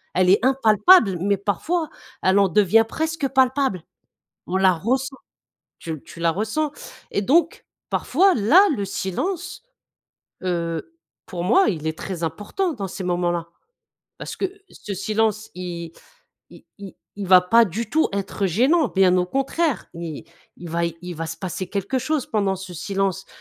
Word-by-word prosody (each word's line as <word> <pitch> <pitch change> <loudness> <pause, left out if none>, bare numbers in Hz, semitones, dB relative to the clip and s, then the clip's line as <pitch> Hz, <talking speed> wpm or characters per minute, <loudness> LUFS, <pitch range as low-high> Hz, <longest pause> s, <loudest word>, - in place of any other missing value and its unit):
elle 180 0 +3
est 200 - +3
impalpable, 225 - +5
mais 200 +1 +1
parfois, 310 - -1 0.3
elle 190 +2 +4
en 200 - +4
devient 210 +4 +4
presque 320 -1 -2
palpable. 260 - +1 0.6
On 185 - -1
la 190 -1 +4
ressent, 260 - -2 0.6
tu 160 -3 -6
tu - - -13
la 165 -1 +3
ressens, 220 - -2 0.4
et 200 - 0
donc 320 - +2 0.2
parfois, 375 +8 +3
là, 310 - +5
le 200 - -2
silence, 350 - -4 0.8
heu, 170 - -3 0.3
pour 180 -6 -5
moi 375 - +4
il 160 -5 -3
est 160 - -2
très 180 -3 -6
important 210 - -2
dans 195 -3 -5
ces 190 +1 -6
moments-là, 175 -1 -1 0.7
parce - - -7
que, - - 0 0.2
ce 205 - -7
silence, 215 +2 -1
il 170 -2 -6 0.6
il - - -15
il 200 -2 -10 0.2
il 200 -1 -4
va 185 0 +7
pas 230 +5 +5
du 215 +5 -5
tout 315 +1 +2
être 200 0 -2
gênant, 260 - +3
bien 190 -2 +3
au 180 - +1
contraire! 275 - -1
Il 165 -3 -7 0.3
il 175 -1 -9
va 170 +1 0
il 175 +2 -7
va 165 +1 -4
se 160 +1 -6
passer 185 +1 -5
quelque 200 +6 -2
chose 275 +1 -1
pendant 200 -3 0
ce 190 -1 -9
silence, 195 +2 -2
200 Hz, 160 wpm, -22 LUFS, 180-260 Hz, 0.8 s, va